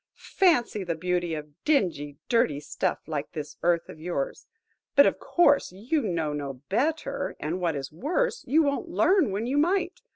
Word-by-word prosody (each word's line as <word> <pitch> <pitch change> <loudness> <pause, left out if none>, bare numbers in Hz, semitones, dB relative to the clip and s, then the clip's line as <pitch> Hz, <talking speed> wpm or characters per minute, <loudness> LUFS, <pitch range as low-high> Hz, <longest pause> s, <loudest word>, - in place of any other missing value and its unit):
Fancy 245 - +1
the 170 -2 -2
beauty 175 0 -1
of 150 -1 -10
dingy, 170 - 0
dirty 230 - +2
stuff 150 - -2
like 150 -2 -4
this 150 -3 -6
earth 170 -1 +2
of - - -11
yours! 160 -4 -4 0.5
But, 280 - +8
of - - +1
course, 290 - +3
you 235 - -1
know 165 - -1
no 140 -2 -4 0.2
better; 280 +6 -1
and, 170 +5 -3
what 170 -3 0
is 135 -1 -5
worse, 440 - -1
you 310 +6 +4
won't 285 +4 -1
learn 345 - +3
when 200 +4 -2
you 270 +4 +1
might. 360 +3 +1
195 Hz, 170 wpm, -27 LUFS, -, 0.5 s, But